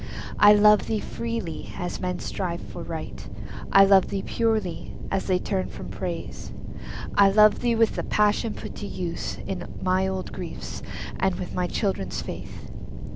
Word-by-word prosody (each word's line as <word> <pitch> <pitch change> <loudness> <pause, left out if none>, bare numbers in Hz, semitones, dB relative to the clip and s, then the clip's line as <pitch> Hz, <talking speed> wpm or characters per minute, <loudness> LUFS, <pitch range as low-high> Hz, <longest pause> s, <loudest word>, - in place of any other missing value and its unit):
I 210 0 +9
love 210 0 +6
thee 220 - +1
freely, 230 -6 -4
as 175 - -4
men 180 -1 -1
strive 175 -3 -3
for - - -8
Right; - - -6 0.4
I 195 0 +8
love 195 -1 +6
thee 195 - -3
purely, 220 -6 0 0.2
as 195 - 0
they 185 -2 +3
turn 190 0 -1
from - - -8
Praise. - - -5 0.6
I 200 -1 +6
love 210 +1 +6
thee 240 -1 +2
with 225 0 +3
the - - -1
passion 210 +1 +2
put - - -7
to 205 - -5
use 175 -4 -4
In - - -4 0.2
my 185 +1 +2
old 190 -1 -3
griefs, - - -6 0.4
and 190 -1 +2
with 180 -2 -5
my 180 -1 0
childhood's 175 - -1
faith. - - -7
195 Hz, 165 wpm, -26 LUFS, 185-210 Hz, 0.6 s, I